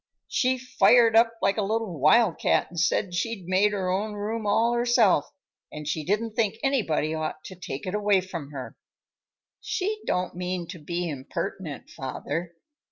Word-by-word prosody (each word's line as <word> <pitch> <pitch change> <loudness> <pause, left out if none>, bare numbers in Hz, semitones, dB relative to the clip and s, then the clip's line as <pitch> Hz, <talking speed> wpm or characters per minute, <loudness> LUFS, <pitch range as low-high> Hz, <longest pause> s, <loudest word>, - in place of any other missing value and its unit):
She 255 0 +1
fired 240 -2 +4
up 230 0 +5
like 195 +1 +2
a - - +2
little 210 -5 -2
wild 180 - +4
cat - - +2
and 170 - -4
said 180 +2 +1
she'd 195 +1 -2
made 190 +3 +3
her 190 -3 -1
own 210 +3 -1
room 210 +1 -3
all 230 +3 +3
herself, 235 - +3 0.4
and 150 -1 -7
she 155 0 -1
didn't 215 +6 -1
think 225 -3 +1
anybody 195 - +1
ought 155 0 -4
to 185 - -9
take 155 -6 -6
it 185 - -3
away 205 -2 +3
from 170 -6 -7
her." 135 -3 -7 0.8
"She 425 +3 -2
don't 180 0 0
mean 180 0 -3
to 180 -2 -7
be 170 +3 -3
impertinent, 150 +2 -5
father. 160 +6 -5
190 Hz, 165 wpm, -26 LUFS, 165-225 Hz, 0.8 s, up